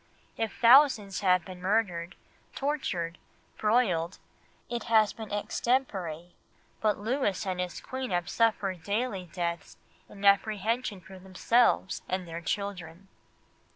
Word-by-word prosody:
If 225 -1 -3
thousands 235 -5 +5
have 180 -3 +3
been 185 -1 -10
murdered, 185 -3 0 0.4
tortured, 185 - -2 0.4
broiled, 195 -6 +1 0.5
it 240 -1 -4
has 220 -2 +4
been 220 -2 -9
extempore; 195 -7 -1 0.5
but 215 -1 +2
Louis 215 -2 -1
and 185 -1 -2
his 180 -1 -3
Queen 260 0 -5
have 175 -2 -1
suffered 200 -5 0
daily 200 -2 -2
deaths 170 -2 -4 0.3
in 200 0 -8
apprehension 210 +1 +2
for 190 +2 -12
themselves 190 +3 +2
and 185 -1 -2
their 165 0 -6
children." 190 -1 -4
200 Hz, 120 wpm, -29 LUFS, 180-225 Hz, 0.5 s, thousands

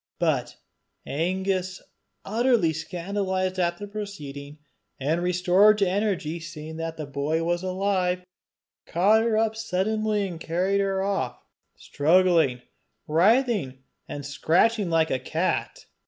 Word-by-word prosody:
But - - 0 0.5
Angus, 185 +3 -1 0.5
utterly 225 -5 +2
scandalized 185 +2 -2
at 175 -1 +1
the 205 - -6
proceeding, 150 -9 -7 0.4
and 155 +5 0
restored 180 +4 +4
to 200 -2 +2
energy 185 -4 -1
by - - -11
seeing 155 0 -8
that 165 0 -4
the 155 - -4
boy 145 +3 -1
was 175 +1 0
alive, 185 -1 -1 0.6
caught 205 +6 +4
her 225 -1 +1
up 220 0 +1
suddenly 215 0 -1
and 170 -3 -7
carried 185 +5 0
her 195 -1 0
off 130 -12 -1 0.4
struggling, 160 -5 +2 0.4
writhing, 185 - +2 0.2
and 145 -1 -6
scratching 180 +8 +2
like 165 -1 +2
a 130 - 0
cat. - - -2
180 Hz, 125 wpm, -25 LUFS, 160-200 Hz, 0.6 s, restored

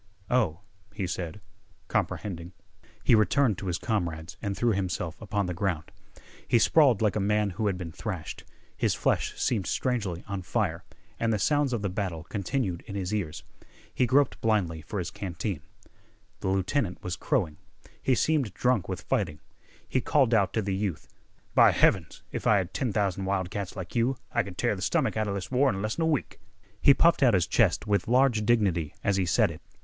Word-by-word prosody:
"Oh," 105 -9 +1 0.3
he 100 -3 -2
said, 90 +2 -4 0.5
comprehending. 90 -3 -2 0.5
He - - +4
returned 110 0 +3
to 100 - -5
his 85 -2 0
comrades 85 -8 -2
and 100 -2 -3
threw 120 -1 +2
himself 90 -3 -2
upon 105 -2 -1
the 90 - -3
ground. 85 -3 -2 0.6
He - - +4
sprawled 125 -2 +4
like 105 - +2
a - - +1
man 105 0 +1
who 105 +3 -1
had 95 -3 0
been 90 -3 -6
thrashed. - - -6 0.3
His - - +1
flesh - - 0
seemed 105 -7 0
strangely 105 -9 -1
on 100 -2 -3
fire, 90 -3 -1 0.4
and 115 0 +1
the 110 - +2
sounds 145 +5 +2
of 115 -4 -2
the - - +1
battle 90 -4 -3
continued 100 -1 -2
in 100 - -6
his 95 0 -2
ears. 95 -8 -3 0.5
He 125 - +2
groped 135 +2 +2
blindly 95 -8 +1
for 85 +7 -6
his 90 - -3
canteen. 90 -3 -4 0.8
The - - -3
lieutenant 95 +2 0
was 90 -1 -3
crowing. 95 - -1 0.4
He 130 - +2
seemed 140 - +1
drunk 125 -8 +1
with 90 -4 -4
fighting. 75 -2 -1 0.5
He 130 - 0
called 130 -1 +3
out 100 -4 +3
to 110 - 0
the 100 0 -1
youth: 95 -5 -3 0.5
"By - - +7
heavens, 85 -5 +2
if - - -3
I 105 - +6
had 95 -2 -2
ten 130 -5 -1
thousand 100 -2 0
wild 95 -2 -1
cats 100 -2 -4
like 95 -3 -7
you 120 +3 +2
I - - +2
could - - -8
tear - - +1
th' - - -8
stomach - - +1
outa 110 -2 0
this 100 +1 -4
war 135 +2 +4
in 95 - -2
less'n 110 +10 -2
a 160 - +2
week!" 150 -6 -1 0.4
He 140 - +7
puffed 170 +3 +4
out 120 -6 +5
his 90 -3 +3
chest - - +2
with 100 -2 +1
large 120 -3 +3
dignity 95 -10 +2
as 100 -1 +2
he 95 -2 +1
said 85 - +3
it. 80 +1 -10
100 Hz, 195 wpm, -28 LUFS, 90-115 Hz, 0.8 s, By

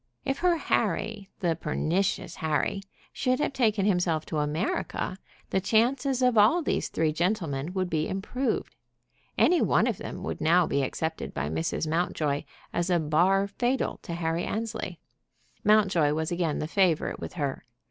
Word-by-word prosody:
If 270 0 -1
her 350 -1 +3
Harry, 215 -9 -1
the 170 -3 +1
pernicious 175 +3 -1
Harry, 160 +5 0 0.3
should 255 -1 0
have 290 - 0
taken 215 -6 +2
himself 175 -5 +1
to 155 - -2
America, 155 +4 -1 0.4
the 190 - +1
chances 250 +6 +2
of 250 -3 +4
all 235 +12 +5
these - - 0
three 155 -1 0
gentlemen 170 -4 -1
would 185 -1 0
be 160 -3 -1
improved. 230 +8 -2 0.6
Any 355 -1 +4
one - - +3
of - - -1
them - - -6
would - - -4
now 170 +2 +4
be 140 - 0
accepted 160 +4 -3
by 75 +1 -2
Mrs. 80 - -1
Mountjoy 155 -3 0 0.3
as 175 +1 0
a 175 -1 +3
bar 175 +6 +3
fatal 240 +6 -1
to 170 - -5
Harry 165 0 -1
Annesley. 225 +1 -4 0.6
Mountjoy 190 -8 +4
was 160 +2 -2
again 170 -3 0
the 155 - -2
favorite 175 -2 +1
with - - -6
her. 145 -5 -3
180 Hz, 160 wpm, -27 LUFS, 160-215 Hz, 0.6 s, all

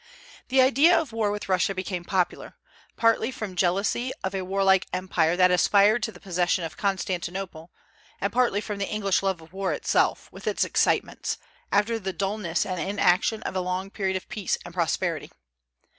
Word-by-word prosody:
The 260 0 +4
idea 280 +7 +5
of 310 -7 -4
war 220 -2 +1
with 205 0 -4
Russia 190 +1 +1
became 185 -1 -4
popular, 180 0 -2 0.4
partly 230 0 +3
from 215 -7 -6
jealousy 200 +8 +1
of 190 - -2
a 190 - -2
warlike 190 0 +2
empire 180 -2 +1
that 180 0 +5
aspired 205 +5 +4
to 220 - -2
the - - -15
possession 180 -1 0
of 165 - -5
Constantinople, 185 -3 -3 0.5
and 200 +1 -2
partly 235 -4 +2
from 210 -1 -5
the 200 - -2
English 200 -3 +1
love 190 -3 -1
of 160 +2 -17
war 195 0 -1
itself, - - +1
with - - -11
its - - +1
excitements, - - 0 0.3
after 225 +3 +2
the 190 -2 -4
dulness 195 -4 -1
and 185 -2 -3
inaction 200 +3 +1
of - - -4
a 185 - +1
long 185 +2 -3
period 190 -2 -1
of 185 - -10
peace 210 -3 -2
and 175 - -9
prosperity. 170 -2 -1
195 Hz, 175 wpm, -26 LUFS, 180-210 Hz, 0.5 s, idea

